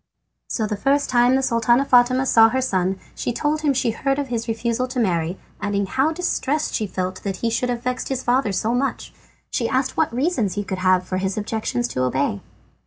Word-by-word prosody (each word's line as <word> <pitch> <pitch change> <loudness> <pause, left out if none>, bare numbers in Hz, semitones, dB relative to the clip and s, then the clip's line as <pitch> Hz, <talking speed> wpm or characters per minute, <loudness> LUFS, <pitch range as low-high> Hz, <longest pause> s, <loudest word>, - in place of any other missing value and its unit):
So 220 - -1
the 210 0 -2
first 275 +7 +1
time 245 +1 +4
the 270 - +1
Sultana 240 +1 +2
Fatima 255 +1 +4
saw 225 -3 +6
her 260 - 0
son 190 -7 0 0.2
she - - -3
told 300 +5 -1
him 300 -2 +2
she 250 -3 +1
had 225 - -12
heard 275 0 +2
of 285 -2 -3
his 230 -1 -3
refusal 235 +2 -1
to 255 0 -4
marry, 175 -4 0 0.2
adding 200 -1 0
how 270 +10 +1
distressed 310 -3 -1
she 215 - -1
felt 185 0 -4
that 195 -2 -3
he 230 - +1
should 250 +2 0
have 240 -1 -3
vexed 250 0 -2
his 260 -1 -2
father 245 -2 +2
so 215 +5 0
much. 270 +3 -2 0.4
She 230 -3 -1
asked 260 0 0
what 320 - +2
reasons 245 - 0
he 205 - -2
could 190 -1 -4
have 185 0 +2
for 185 - -2
his 190 +1 -2
objections 220 +3 -2
to 130 - -2
obey. 130 -5 0
235 Hz, 220 wpm, -22 LUFS, 200-260 Hz, 0.4 s, saw